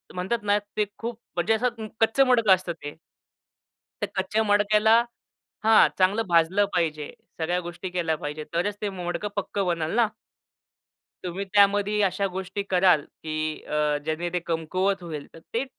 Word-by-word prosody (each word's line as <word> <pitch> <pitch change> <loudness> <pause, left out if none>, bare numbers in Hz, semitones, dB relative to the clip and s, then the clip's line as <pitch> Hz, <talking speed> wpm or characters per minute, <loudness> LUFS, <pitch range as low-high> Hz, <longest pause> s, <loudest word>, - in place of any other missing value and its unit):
म्हणतात 190 +6 -1
ना, 205 0 +3
ते 205 +1 -3
खूप 235 0 -5 0.2
म्हणजे 175 +6 +2
असं 230 -1 -1
कच्चं 245 +5 +4
मडकं 230 -5 +4
असतं 185 -2 -5
ते. 145 -2 -9 1.1
त्या - - -1
कच्च्या 215 +3 0
मडक्याला 210 +2 +4 0.6
हा 220 0 +7
चांगलं 195 +4 +3
भाजलं 175 +4 +3
पाहिजे. 155 -4 -1 0.3
सगळ्या 175 +3 0
गोष्टी 175 +1 -6
केल्या 170 -3 -1
पाहिजे. 150 +1 -5
तरच 200 +5 -1
ते 205 - -1
मडकं 180 +1 -4
पक्कं 200 0 -2
बनेल 165 -2 -1
ना. 235 -2 +4 1.2
तुम्ही 180 +2 -3
त्यामध्ये 205 +1 +4
अशा 195 +1 +1
गोष्टी 190 +2 -4
कराल, 180 -4 +4
की 155 +1 -5
अ, 150 -1 0
ज्यांनी 165 +2 -2
ते 180 - +1
कमकुवत 185 +4 -1
होईल, 155 -4 -6
तर 165 - -12
ते 245 +4 0
185 Hz, 150 wpm, -25 LUFS, 170-210 Hz, 1.2 s, हा